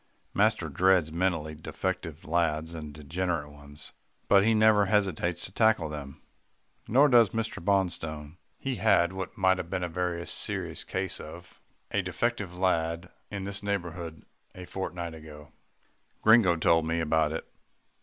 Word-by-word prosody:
Master 105 -4 +2
dreads 90 +1 +3
mentally 85 -3 -1
defective 80 0 -4
lads 80 -1 0
and 75 -2 -7
degenerate 75 +1 -3
ones, 75 0 -12 0.3
but 100 - +6
he 110 +1 +3
never 110 -2 +5
hesitates 90 -4 0
to - - -8
tackle 110 -6 +2
them. 70 -2 -8 0.6
Nor 135 +6 +5
does 120 -6 +6
Mr. 110 -6 -3
Bonstone. 85 -5 -1 0.2
He 135 -3 -3
had 95 -5 +3
what 95 +4 -6
might 95 -2 +3
have 85 - -5
been 95 -1 -2
a - - 0
very 85 0 -2
serious - - -2
case 95 0 -2
of 85 +3 -11 0.3
a - - +1
defective 120 -6 -2
lad 85 -1 0 0.2
in 100 -2 -5
this 100 0 -4
neighbourhood 85 -5 -4 0.3
a 90 - -8
fortnight 85 -3 -5
ago. 75 -1 -12 0.7
Gringo 110 -6 +6
told 80 0 +3
me 85 +1 0
about 80 -1 +2
it. 80 - -5
85 Hz, 145 wpm, -28 LUFS, 80-95 Hz, 0.7 s, but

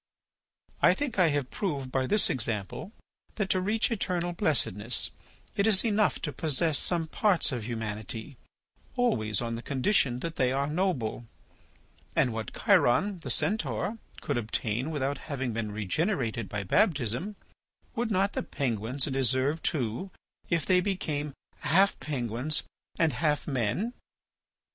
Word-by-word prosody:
"I - - +6
think 275 -8 -2
I 180 - +6
have 145 -4 0
proved 140 -10 -2
by 130 -1 +1
this 210 +6 +4
example 120 - -2 0.4
that, 205 -3 0
to 185 - +2
reach 215 +5 +1
eternal 175 -5 -1
blessedness, 120 - 0 0.4
it 200 - +2
is 205 -2 +4
enough 210 - +2
to 150 - -2
possess 155 0 +1
some 170 -2 0
parts 185 +1 +2
of 120 -5 -3
humanity, 110 +2 -5 0.6
always 110 - +1
on 115 0 -2
the 115 - -4
condition 130 - +1
that 165 -1 -4
they 125 -1 +3
are 135 +1 +1
noble. 150 - -1 0.9
And 125 - +3
what 110 -1 -4
Chiron, 185 +10 +4
the 165 - -6
Centaur, 220 +1 0 0.2
could - - 0
obtain 115 +3 -2
without 140 -2 -1
having 135 -4 -2
been 110 -1 -2
regenerated 115 - -1
by 105 -1 -3
baptism, 145 - +1 0.6
would 235 0 -1
not 195 -1 +2
the - - -1
penguins 125 -1 -1
deserve 135 +2 +1
too, 130 - -1 0.4
if 170 -2 +1
they 185 -1 +4
became 150 -7 -2 0.2
half 190 +7 +3
penguins 130 +1 -1 0.3
and 160 -4 +3
half 150 +3 0
men? 135 - 0
145 Hz, 140 wpm, -29 LUFS, 120-185 Hz, 0.9 s, I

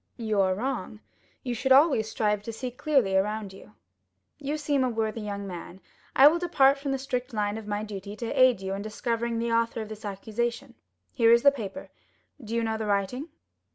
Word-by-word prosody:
"You 215 -4 0
are 185 -1 +2
wrong; 225 -2 -4 0.4
you 245 - -2
should 250 +3 -2
always 265 -6 +5
strive 210 -2 0
to 230 - -6
see 250 +3 -5
clearly 250 -7 +1
around 205 0 0
you. 105 - -15 0.6
You 295 +2 -3
seem 290 -3 +1
a 255 - +1
worthy 225 -1 -2
young 200 -1 -5
man; 180 0 -8 0.4
I 275 - +9
will 330 +3 +4
depart 280 -6 +3
from 275 0 -3
the 270 - 0
strict 255 -3 -4
line 205 -1 0
of 220 -1 -7
my 205 0 -2
duty 200 -1 -7
to 230 +1 -5
aid 255 -6 +4
you 190 0 -3
in 195 - -4
discovering 230 +2 -2
the 230 0 -1
author 230 0 +1
of 215 -1 -5
this 215 0 -9
accusation. 235 +5 -3 0.4
Here 230 0 +4
is 235 0 +5
the 280 - +7
paper; 240 0 -7 0.5
do 225 +1 -4
you 230 - +1
know 220 -1 -1
the 215 - -3
writing?" 205 - -1
225 Hz, 205 wpm, -27 LUFS, 210-260 Hz, 0.6 s, I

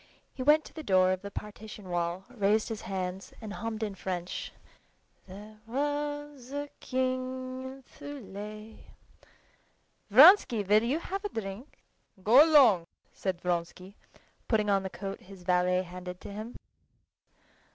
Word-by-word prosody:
He - - -7
went 300 +3 +5
to - - -13
the 315 - -7
door 185 -7 +4
of 185 0 -1
the 200 - -6
partition 210 -1 -9
wall, 175 +1 -2
raised 215 -2 +1
his 220 -2 -4
hands, 190 0 -4
and 215 -3 -7
hummed 225 0 -4
in 210 -2 -2
French, 180 -2 -4 0.8
"There 210 +3 -11
was 290 0 -3
a 285 0 -4
king 255 0 -2
in 265 +1 -9
Thule." 215 -6 -9 1.3
"Vronsky, 255 - +8
will 210 +2 +4
you 245 +6 0
have 390 +4 -5
a 415 - -2
drink?" 220 - -7 0.5
"Go 245 +8 +8
along," 255 - +6 0.3
said 185 -3 -3
Vronsky, 180 +2 -3 0.5
putting 210 -3 +2
on 195 -1 +3
the 190 - -4
coat 195 +1 -6
his 190 -1 -13
valet 180 0 +2
handed 180 0 -8
to 200 - -8
him. 215 +4 -7
215 Hz, 140 wpm, -29 LUFS, 190-260 Hz, 1.3 s, Vronsky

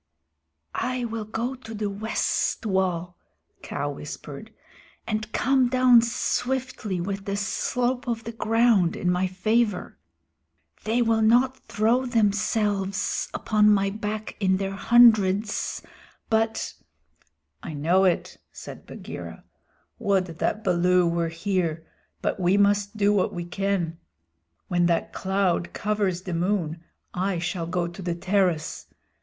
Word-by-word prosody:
"I 255 -1 -2
will 225 -2 -4
go 230 +4 -3
to 235 -4 -9
the 210 0 -2
west 215 +2 -1
wall," 180 -3 -1 0.4
Kaa - - -3
whispered, - - -8 0.5
"and 215 0 -3
come 260 0 +2
down 255 -2 +6
swiftly 240 -3 -2
with 195 +2 -4
the 200 - -2
slope 245 +5 -1
of 230 -1 -2
the 230 - -5
ground 225 -5 +2
in 180 - 0
my 180 +1 +1
favor. 210 +2 0 0.9
They 230 +3 +2
will 225 -1 +2
not 245 +4 +4
throw 235 +4 +1
themselves 205 -3 0
upon 210 -1 +2
my 200 -1 +3
back 215 +1 -4
in 190 -2 +2
their 195 0 -2
hundreds, 215 -2 +3 0.5
but 225 0 0 0.4
" - - -42
"I 155 - -6
know 170 +6 +3
it," 185 -2 0
said - - -10
Bagheera. - - -8 0.6
"Would 195 -2 +2
that 215 - -1
Baloo 180 -1 +3
were 170 0 0
here, 165 -2 -2 0.4
but - - -1
we 185 +2 +3
must 205 +1 +2
do 205 0 +3
what 195 -3 +1
we 175 -1 -4
can. 175 -2 -2 0.7
When 175 -1 +2
that 170 -1 0
cloud 190 -2 0
covers 200 -4 -1
the 185 - -4
moon 170 -2 -1 0.3
I 185 0 -1
shall 170 0 -3
go 175 0 -1
to 175 +3 -9
the 175 -2 -2
terrace. 180 -3 0
200 Hz, 130 wpm, -25 LUFS, 180-225 Hz, 0.9 s, down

